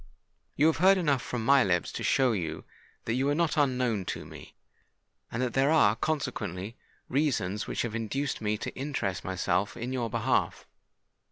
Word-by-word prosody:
You 150 Hz, -, +3 dB
have 160 Hz, -, +3 dB
heard 190 Hz, +3 st, +5 dB
enough 145 Hz, -8 st, +1 dB
from 115 Hz, -2 st, -4 dB
my 140 Hz, +1 st, +6 dB
lips 90 Hz, -3 st, 0 dB
to -, -, -6 dB
show 130 Hz, -2 st, +3 dB
you 80 Hz, -7 st, -3 dB, 0.4 s
that 115 Hz, -, -1 dB
you 135 Hz, +3 st, +1 dB
are 145 Hz, -, +2 dB
not 165 Hz, -2 st, +1 dB
unknown 125 Hz, -, +1 dB
to -, -, -4 dB
me, -, -, -12 dB, 0.8 s
and 120 Hz, +3 st, -1 dB
that 125 Hz, -, -2 dB
there 135 Hz, +1 st, +3 dB
are 115 Hz, -10 st, +5 dB
consequently 115 Hz, -, -3 dB, 0.3 s
reasons 125 Hz, -9 st, 0 dB
which -, -, -2 dB
have 120 Hz, -2 st, -4 dB
induced 120 Hz, +5 st, -2 dB
me 105 Hz, 0 st, 0 dB
to -, -, -6 dB
interest 130 Hz, -9 st, -3 dB
myself 95 Hz, +2 st, -1 dB
in 125 Hz, +3 st, -4 dB
your 120 Hz, -3 st, -1 dB
behalf. 115 Hz, +3 st, 0 dB
125 Hz, 175 wpm, -29 LUFS, 105-140 Hz, 0.8 s, my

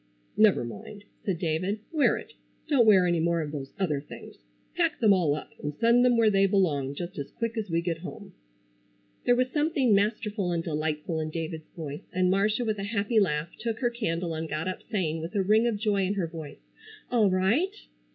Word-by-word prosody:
"Never 215 Hz, -, +4 dB
mind," 120 Hz, -, -9 dB, 0.2 s
said 190 Hz, -4 st, -1 dB
David. 175 Hz, +5 st, -1 dB
"Wear 310 Hz, -3 st, +3 dB
it. -, -, -10 dB, 0.3 s
Don't 255 Hz, -7 st, +4 dB
wear 190 Hz, -4 st, +6 dB
any 175 Hz, -1 st, +2 dB
more 170 Hz, 0 st, +1 dB
of 150 Hz, -2 st, -4 dB
those 140 Hz, -2 st, -6 dB
other 155 Hz, -7 st, 0 dB
things. 150 Hz, -, -11 dB, 0.4 s
Pack 330 Hz, -3 st, +1 dB
them 215 Hz, -4 st, +5 dB
all 165 Hz, -6 st, +2 dB
up 150 Hz, -, -8 dB
and 150 Hz, 0 st, -4 dB
send 235 Hz, +6 st, +4 dB
them 245 Hz, -1 st, +4 dB
where 225 Hz, -2 st, +4 dB
they 195 Hz, 0 st, +4 dB
belong, 150 Hz, -9 st, +1 dB
just 175 Hz, 0 st, -6 dB
as 140 Hz, -, -5 dB
quick 230 Hz, 0 st, -4 dB
as 215 Hz, -3 st, -3 dB
we 165 Hz, 0 st, +1 dB
get 165 Hz, -2 st, -2 dB
home." 190 Hz, +2 st, -9 dB, 0.9 s
There 245 Hz, -, +5 dB
was 255 Hz, +1 st, +1 dB
something 295 Hz, -6 st, +2 dB
masterful 205 Hz, -2 st, 0 dB
and 170 Hz, -1 st, -1 dB
delightful 155 Hz, +1 st, -2 dB
in 155 Hz, 0 st, -2 dB
David's 160 Hz, 0 st, -5 dB
voice, 150 Hz, -3 st, -7 dB
and 185 Hz, 0 st, +2 dB
Marcia 210 Hz, +5 st, +1 dB
with 215 Hz, -2 st, -1 dB
a -, -, -3 dB
happy 210 Hz, +1 st, +1 dB
laugh 150 Hz, -5 st, 0 dB
took 230 Hz, -1 st, -2 dB
her 240 Hz, -2 st, +2 dB
candle 175 Hz, -8 st, -2 dB
and 160 Hz, 0 st, -4 dB
got 155 Hz, +3 st, -3 dB
up 185 Hz, -, -4 dB
saying, 165 Hz, -7 st, -1 dB
with 165 Hz, +4 st, -6 dB
a 195 Hz, -, +2 dB
ring 215 Hz, +4 st, +4 dB
of 230 Hz, -3 st, 0 dB
joy 205 Hz, -2 st, +1 dB
in 195 Hz, +2 st, 0 dB
her 190 Hz, -4 st, 0 dB
voice: 160 Hz, -3 st, -10 dB, 0.4 s
"All 225 Hz, -5 st, +4 dB
right!" 215 Hz, -, +1 dB
190 Hz, 210 wpm, -27 LUFS, 160-220 Hz, 0.9 s, wear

